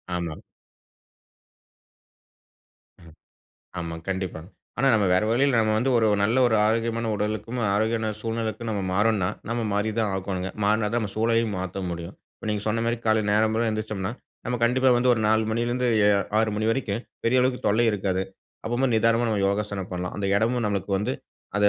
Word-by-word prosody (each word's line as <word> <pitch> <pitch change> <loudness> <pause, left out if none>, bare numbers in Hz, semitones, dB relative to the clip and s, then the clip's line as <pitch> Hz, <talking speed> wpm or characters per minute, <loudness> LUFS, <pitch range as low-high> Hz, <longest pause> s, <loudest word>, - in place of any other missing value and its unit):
ஆமாங். 85 -3 -4 2.6
ம். 85 -2 -15 0.7
ஆமாங்க. 85 -1 -5
கண்டிப்பாங்க. 95 -3 -4 0.3
ஆனா 135 +2 +3
நம்ம 105 -3 +3
வேறு 95 +4 +3
வழியில 130 +1 +3
நம்ம 110 0 +1
வந்து 130 +3 +1
ஒரு 110 - +3 0.2
நல்ல 115 +6 +2
ஒரு 115 - +2
ஆரோக்கியமான 115 0 0
உடலுக்கும், 110 +4 -3 0.2
ஆரோக்கியமான 110 +1 0
சூழ்நிலைக்கும் 115 0 -3
நம்ம 100 -2 -2
மாறோன்னா, 105 -2 +2 0.2
நம்ம 115 0 -1
மாறி 105 +2 0
தான் 105 -3 +1
ஆகணுங்க. 95 -1 -3
மாறுனா 105 +1 +2
தான் 120 +2 0
நம்ம 100 -3 -4
சூழலயும் 115 -1 +1
மாத்த 95 +1 -4
முடியும். 85 +2 -6 0.2
இப்ப 110 - -8
நீங்க 105 -1 -2
சொன்னமாரி 115 +2 0
காலையில 110 -1 +2
நேரம்போற 110 +2 +2
எந்திரிச்சம்ன்னா, 110 -1 -3 0.3
நம்ம 125 -1 -1
கண்டிப்பா 130 +2 +3
வந்து 125 +1 +3
ஒரு 110 - -2
4மணில 110 +1 +1
இருந்து 125 +1 0 0.5
6 110 -1 +2
மணி 110 +1 0
வரைக்கும் 115 -2 -2 0.2
பெரிய 125 +2 +3
அளவுக்கு 125 0 0
தொல்லை 110 +3 +3
இருக்காது. 95 -2 -1 0.4
அப்பமோ 120 +3 +1
நிதானமா 115 +1 +3
நம்ம 105 -3 0
யோகாசனம் 100 -2 -3
பண்ணலாம். 90 0 -4
அந்த 100 -1 -2
இடமும் 115 +1 +1
நமக்கு 100 0 -3
வந்து 105 - -1 0.4
அத 105 0 +5
110 Hz, 160 wpm, -25 LUFS, 100-115 Hz, 2.6 s, அத